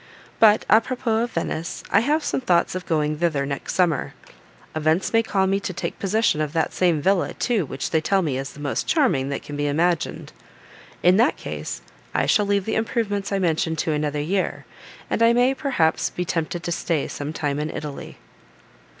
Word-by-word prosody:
But 215 -1 +5
à 220 - +6
propos 235 -2 -1
of 240 - -10
Venice, 165 0 -3
I - - +6
have 295 +6 +1
some - - -1
thoughts 180 -8 +2
of 185 0 -5
going 150 -2 0
thither, 155 -5 +1
next 140 0 -4
summer; 175 -5 +1 0.6
events 155 +6 +1
may 225 - +5
call 195 -4 +1
me 195 +1 +1
to 195 -1 -4
take 190 - -5
possession 200 -5 +1
of 150 -1 -2
that 165 -1 0
same 170 -5 +1
villa, 190 0 +1
too, 220 - 0
which 130 - -4
they 160 - +2
tell 195 +4 +2
me 145 -5 -1
is 135 +1 -6
the - - -13
most 140 -2 -2
charming 230 - +2
that 140 - -4
can 145 - -7
be 145 0 -1
imagined. 170 +4 0 0.7
In 180 +2 +5
that 240 +6 +3
case - - -6 0.3
I - - +2
shall 210 -1 +3
leave 200 -1 +1
the 220 - -2
improvements 215 -3 -1
I 195 - +1
mention 165 -3 0
to 160 +1 -1
another 150 -1 -1
year, 185 +6 -1 0.4
and - - -1
I 230 0 +6
may, 245 +2 +3
perhaps, 250 - +1
be 180 - -4
tempted 170 0 -2
to 175 - -3
stay 165 -3 -1
some 145 +1 -5
time 145 -2 -2
in 150 +1 -2
Italy." 150 -2 -7
175 Hz, 200 wpm, -23 LUFS, 150-210 Hz, 0.7 s, à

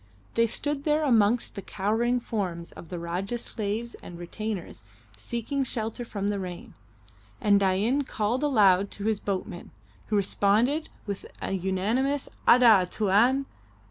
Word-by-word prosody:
They 230 0 +3
stood 285 +4 -2
there 305 0 +2
amongst 230 -3 +3
the 200 - -6
cowering 225 +6 0
forms 180 -8 -3
of 165 - -12
the 180 - -5
Rajah's 180 +7 -3
slaves 220 +2 -3
and 175 - -9
retainers 185 - -5 0.3
seeking 235 - -3
shelter 230 -1 -3
from 205 -3 -3
the 205 -1 -1
rain, 180 -2 -7 0.7
and 200 -1 +4
Dain 200 +8 +2
called 240 -1 -1
aloud 200 -9 +4
to 200 - -6
his 220 -2 +1
boatmen, 190 -4 -4 0.4
who 215 - 0
responded 215 +9 +2 0.2
with 200 -2 -5
an 195 -2 -3
unanimous 225 +10 0 0.2
"Ada! 225 -7 +7
Tuan!" 225 +8 +3
210 Hz, 140 wpm, -27 LUFS, 195-240 Hz, 0.7 s, Ada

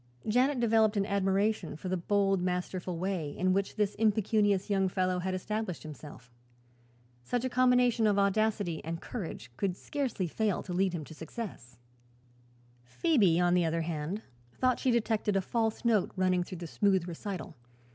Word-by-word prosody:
Janet 255 +5 +2
developed 220 -2 +3
an 195 - +2
admiration 200 -1 0
for 160 - -7
the 185 - 0
bold, 195 +1 +1
masterful 180 0 -2
way 175 -5 -3
in 185 0 +2
which 195 +1 -1
this 210 -1 +1
impecunious 210 -2 +2
young 195 -2 +2
fellow 185 -1 0
had 185 +1 -2
established 210 -1 -3
himself. 145 -5 -11 0.9
Such 245 - -1
a - - 0
combination 250 -2 +3
of 205 -1 +2
audacity 200 -3 +1
and 165 +1 -4
courage 165 - -6
could 185 -2 -1
scarcely 270 -10 -2
fail 205 +3 -1
to 180 - -6
lead 185 0 +1
him 165 -3 -3
to 160 - -11
success. 160 - -8 1.1
Phoebe, 190 - +2
on 175 0 +3
the 180 -1 +3
other 165 0 0
hand, 165 +5 -3 0.3
thought 255 -1 +1
she 260 - +1
detected 220 -3 +1
a - - +4
false 225 +3 -1
note 220 -5 +3
running 185 -1 +2
through 180 - -8
the 170 - -6
smooth 190 +1 +1
recital. 180 +2 -6
195 Hz, 165 wpm, -30 LUFS, 175-220 Hz, 1.1 s, a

